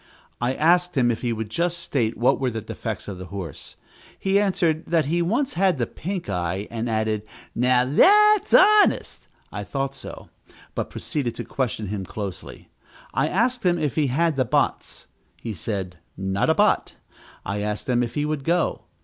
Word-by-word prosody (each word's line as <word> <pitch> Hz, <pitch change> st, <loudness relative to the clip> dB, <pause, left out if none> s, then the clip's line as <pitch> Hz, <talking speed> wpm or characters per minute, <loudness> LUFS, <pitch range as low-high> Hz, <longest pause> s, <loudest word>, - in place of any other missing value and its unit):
I 125 Hz, +2 st, 0 dB
asked 175 Hz, +1 st, +2 dB
him 120 Hz, -2 st, +4 dB
if 115 Hz, -, -4 dB
he 120 Hz, -, -1 dB
would 110 Hz, -1 st, -4 dB
just 170 Hz, +5 st, 0 dB
state 120 Hz, -9 st, -1 dB
what 125 Hz, +3 st, +3 dB
were 130 Hz, -2 st, +1 dB
the 115 Hz, -2 st, -4 dB
defects 110 Hz, -1 st, -6 dB
of 95 Hz, -3 st, -6 dB
the 90 Hz, -, -7 dB
horse. 90 Hz, -5 st, -7 dB, 0.4 s
He 195 Hz, +1 st, +2 dB
answered, 175 Hz, -5 st, +1 dB
that 165 Hz, -3 st, +2 dB
he 170 Hz, +4 st, 0 dB
once 250 Hz, +10 st, 0 dB
had 185 Hz, -2 st, +2 dB
the 120 Hz, -, 0 dB
pink 185 Hz, +7 st, -5 dB
eye, 95 Hz, +1 st, -2 dB
and 115 Hz, +1 st, -3 dB
added, 110 Hz, -1 st, 0 dB, 0.3 s
"now 125 Hz, +1 st, +3 dB
that's 420 Hz, -, +5 dB
honest." 420 Hz, +2 st, +4 dB, 0.2 s
I -, -, -5 dB
thought 135 Hz, -1 st, -3 dB
so, -, -, -10 dB, 0.4 s
but -, -, -3 dB
proceeded 130 Hz, -6 st, -3 dB
to -, -, -5 dB
question 110 Hz, -6 st, -3 dB
him 100 Hz, -2 st, -3 dB
closely. 100 Hz, -1 st, -7 dB, 0.4 s
I -, -, +1 dB
asked 240 Hz, +5 st, +1 dB
him 175 Hz, -2 st, +3 dB
if 150 Hz, -5 st, -1 dB
he 150 Hz, -3 st, +1 dB
had 155 Hz, +3 st, +1 dB
the 130 Hz, -, +3 dB
bots. 115 Hz, -, -1 dB, 0.3 s
He 115 Hz, -, -5 dB
said, 95 Hz, -2 st, -4 dB, 0.2 s
not 95 Hz, 0 st, 0 dB
a -, -, +4 dB
bot. -, -, +2 dB, 0.5 s
I 100 Hz, +2 st, -2 dB
asked 105 Hz, 0 st, -3 dB
him 125 Hz, -1 st, +2 dB
if 120 Hz, -1 st, -3 dB
he 150 Hz, 0 st, 0 dB
would 150 Hz, -2 st, -2 dB
go. 170 Hz, +3 st, 0 dB
130 Hz, 185 wpm, -24 LUFS, 110-170 Hz, 0.5 s, that's